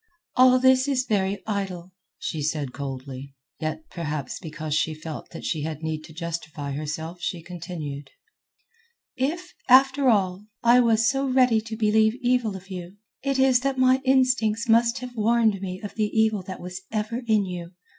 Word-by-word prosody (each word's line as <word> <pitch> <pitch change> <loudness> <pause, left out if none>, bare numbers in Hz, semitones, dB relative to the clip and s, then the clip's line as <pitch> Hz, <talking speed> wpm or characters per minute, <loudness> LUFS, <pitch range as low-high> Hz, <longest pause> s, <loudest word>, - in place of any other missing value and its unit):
"All 255 0 +7
this 260 +1 +4
is 260 -3 +1
very 200 -4 0
idle," 190 -4 -4 0.2
she 155 - -4
said 145 -3 -2
coldly. 135 0 -7 0.2
Yet 155 0 -4
perhaps 150 -5 -4
because 155 -2 -5
she 155 +1 +1
felt 155 0 -7
that 165 - -9
she 155 - -1
had 155 0 -5
need 155 -1 -3
to - - -13
justify 160 -3 -5
herself 155 +4 -5
she 170 -1 -3
continued: 160 -5 -7 1.1
"If, 330 +8 -2 0.2
after 265 +1 +6
all, 195 -2 +1 0.2
I 240 +1 +6
was 230 -2 +3
so 270 +3 +1
ready 255 -4 +4
to 220 0 -7
believe 220 0 +3
evil 245 -4 +1
of 190 +1 -11
you, 180 +1 -7 0.2
it 275 0 0
is 265 -2 +5
that 270 +1 -1
my 260 +1 +4
instincts 255 -4 +2
must 235 +2 +4
have 250 -1 -7
warned 220 -2 +2
me 185 -1 -4
of 205 - -6
the 215 -1 0
evil 220 -2 +2
that 185 - -6
was 180 +1 -7
ever 220 +2 -2
in 215 -3 +3
you. 180 -1 -6
200 Hz, 170 wpm, -25 LUFS, 160-245 Hz, 1.1 s, All